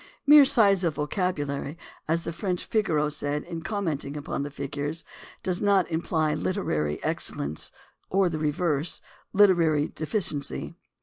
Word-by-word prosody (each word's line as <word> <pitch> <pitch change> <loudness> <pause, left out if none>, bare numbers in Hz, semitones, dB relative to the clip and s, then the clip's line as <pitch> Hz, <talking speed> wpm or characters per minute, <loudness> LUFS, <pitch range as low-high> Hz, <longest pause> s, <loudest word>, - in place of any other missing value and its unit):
Mere 295 0 +9
size 200 -7 +4
of 165 -3 0
vocabulary, 150 -3 -2 0.3
as 165 +1 +1
the - - -3
French 180 0 -2
Figaro 165 -9 +1
said 145 0 -2
in 170 -2 -6
commenting 160 -8 -2
upon 145 -1 -3
the 145 - -3
figures, 145 +3 -4 0.4
does 185 -1 0
not 195 -4 +3
imply 160 -1 0
literary 75 - -1
excellence, 75 +2 -2 0.4
or 195 0 +3
the 160 -3 -2
reverse 155 0 0 0.2
— - - -33
literary 165 -7 +4
deficiency. 155 -3 -3
160 Hz, 135 wpm, -27 LUFS, 145-185 Hz, 0.4 s, Mere